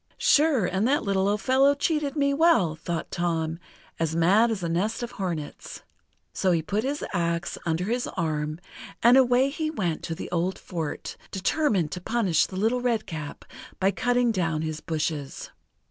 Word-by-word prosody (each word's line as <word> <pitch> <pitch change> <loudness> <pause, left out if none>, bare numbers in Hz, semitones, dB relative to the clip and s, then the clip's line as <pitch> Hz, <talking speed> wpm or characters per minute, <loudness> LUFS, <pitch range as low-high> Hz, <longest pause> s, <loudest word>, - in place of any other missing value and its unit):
"Sure, 290 - +4
and 190 +5 0
the 285 +3 +3
little 195 -2 0
old 205 0 0
fellow 270 +5 +4
cheated 295 -1 0
me 280 -1 +2
well!" 285 - +3
thought 165 +1 -4
Tom, 165 -2 -1 0.4
as 165 -1 0
mad 195 +8 +4
as 210 -5 -3
a - - 0
nest 205 +8 -1
of 240 - -5
hornets. 170 -6 -5 0.5
So 185 - +1
he 165 -2 +1
put 205 +6 -1
his 285 +2 -2
axe 170 -1 -1
under 165 +2 0
his 240 +5 -1
arm, 155 -2 -2 0.4
and 240 +2 +7
away 260 0 +4
he 310 +1 -2
went 180 - -2
to 165 - -3
the - - -7
old 180 +2 0
fort, 165 -5 -5
determined 195 - 0
to 180 - -5
punish 195 -6 +1
the - - -9
Little 225 +5 +1
Redcap 215 -12 -3 0.3
by 195 +1 +3
cutting 245 +1 +1
down 165 -6 -1
his 155 -1 -3
bushes. 155 -3 -3
190 Hz, 170 wpm, -26 LUFS, 165-245 Hz, 0.5 s, and